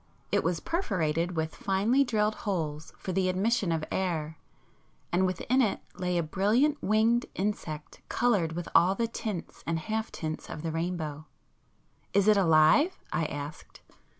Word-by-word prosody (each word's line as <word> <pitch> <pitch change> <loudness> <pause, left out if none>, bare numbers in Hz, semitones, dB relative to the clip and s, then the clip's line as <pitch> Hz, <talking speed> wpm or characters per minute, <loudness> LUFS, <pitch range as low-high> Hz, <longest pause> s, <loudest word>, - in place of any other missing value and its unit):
It - - +2
was 165 +1 0
perforated 175 - -1
with 160 0 -1
finely 210 +8 +2
drilled 215 -4 +1
holes 160 -7 -3
for 190 - -5
the 185 0 +1
admission 200 +1 +1
of 160 -1 0
air, 160 -5 -2 0.7
and 185 +2 +3
within 225 +9 +1
it 215 -5 +1
lay 180 -1 -1
a 170 - +1
brilliant 220 - +2
winged 225 +3 +2
insect 175 -6 -4
coloured 205 -10 +2
with 175 +1 -4
all 185 +3 +5
the 230 +2 0
tints 215 -5 -5
and 165 0 +1
half 220 +6 -3
tints 155 -1 -5
of 155 - -6
the 165 - -2
rainbow. 160 -2 -3 0.9
"Is 200 +1 +3
it 215 - +7
alive?" 170 - +5 0.2
I 165 - +1
asked. 145 +1 -7
185 Hz, 150 wpm, -29 LUFS, 160-215 Hz, 0.9 s, it